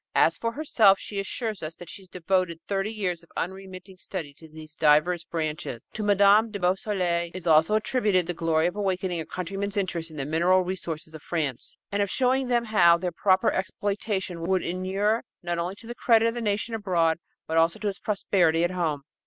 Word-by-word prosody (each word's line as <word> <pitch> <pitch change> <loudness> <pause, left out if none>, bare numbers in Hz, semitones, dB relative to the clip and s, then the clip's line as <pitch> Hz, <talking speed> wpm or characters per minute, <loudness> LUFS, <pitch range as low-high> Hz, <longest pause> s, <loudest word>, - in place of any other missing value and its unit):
As - - +4
for 230 0 -3
herself, 225 -9 +4
she 200 0 -5
assures 215 +1 -3
us 155 +1 -5
that 175 - -11
she 195 - -8
devoted 180 -1 -1
thirty 195 +1 -1
years 185 -6 -2
of 170 - -21
unremitting 190 0 -6
study 165 -8 -6
to 160 +2 -16
these 155 0 -12
divers 160 +3 +3
branches. 155 -7 -4
To 215 - -4
Mme. 205 +2 +5
de 210 - -5
Beausoleil 180 -2 0
is 185 -2 -7
also 160 +5 +4
attributed 215 -5 +1
the 175 - -3
glory 165 -1 +1
of 175 +2 -1
awakening 190 -3 -1
her 160 - -4
countrymen's 195 +3 -4
interest 175 -4 -2
in 155 - -11
the 135 - -3
mineral 175 +5 +3
resources 165 -4 -5
of 155 - -9
France, 150 -8 -3
and 200 0 0
of 200 - 0
showing 260 +2 +1
them 240 -1 +1
how 175 -6 +5
their 180 +1 -3
proper 185 +2 +2
exploitation 190 -1 -2
would 185 +2 0
inure 195 +5 0 0.2
not 175 -1 -2
only 175 +3 -3
to 225 - -15
the 240 - -6
credit 230 -2 +3
of 230 - 0
the 240 - -4
nation 215 +1 -1
abroad 175 -7 +1 0.3
but 160 - -2
also 165 +1 +3
to 210 - -3
its 195 - -3
prosperity 175 -5 +1
at 175 - +1
home. 160 -6 -2
185 Hz, 200 wpm, -26 LUFS, 165-205 Hz, 0.3 s, Mme